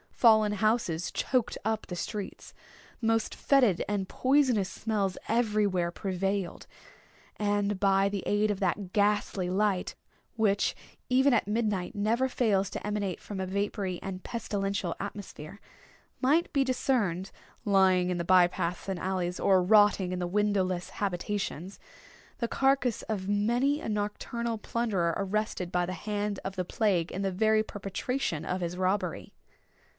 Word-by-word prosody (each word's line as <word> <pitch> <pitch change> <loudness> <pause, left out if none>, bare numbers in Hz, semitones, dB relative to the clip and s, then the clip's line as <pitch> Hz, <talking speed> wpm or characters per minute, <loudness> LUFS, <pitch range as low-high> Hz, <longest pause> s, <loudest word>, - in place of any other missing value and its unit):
Fallen 220 -3 +4
houses 210 -6 0
choked 255 -4 0
up 220 0 -1
the 180 - -6
streets. 205 +2 -6 0.5
The 225 - 0
most 225 0 +1
fetid 250 -11 +3
and 200 -2 -1
poisonous 255 -7 +2
smells 205 -4 -2
everywhere 210 -6 +1
prevailed;—and 200 +2 -3
by 195 0 +3
the 200 -1 -3
aid 210 +1 +2
of 200 - -3
that 190 -3 -1
ghastly 205 -3 +1
light 195 -1 0 0.4
which, 205 -3 +2 0.3
even 265 +2 +4
at 225 - +2
midnight, 210 -3 -1
never 225 +5 +1
fails 205 -7 +1
to - - -5
emanate 205 -3 -2
from 200 -2 -7
a 190 - -2
vapory 195 -1 -2
and 190 -1 -6
pestilential 200 -6 -2
atmosphere, 200 -2 -7 0.6
might 300 +6 +2
be 275 -2 +3
discerned 235 -8 0 0.3
lying 190 -3 +4
in 180 - -1
the 170 - -1
by 185 0 +6
paths 175 +1 -4
and 190 -2 -2
alleys, 180 -1 -2
or 190 -2 +4
rotting 205 -2 +4
in 180 - -2
the 175 - -1
windowless 190 -2 0
habitations, 195 -1 -3 0.6
the 235 - 0
carcass 265 -2 +1
of 200 -4 -3
many 240 +8 +1
a - - -4
nocturnal 220 +2 -2
plunderer 200 -7 0
arrested 195 -2 -2
by 175 0 +1
the 185 - -4
hand 205 +2 -3
of 190 0 -5
the 185 -1 -2
plague 185 -5 0
in 190 - -4
the 195 - 0
very 215 +3 +3
perpetration 200 - -3
of 185 0 -2
his 175 +1 -3
robbery. 185 -1 -1
205 Hz, 145 wpm, -29 LUFS, 185-220 Hz, 0.6 s, by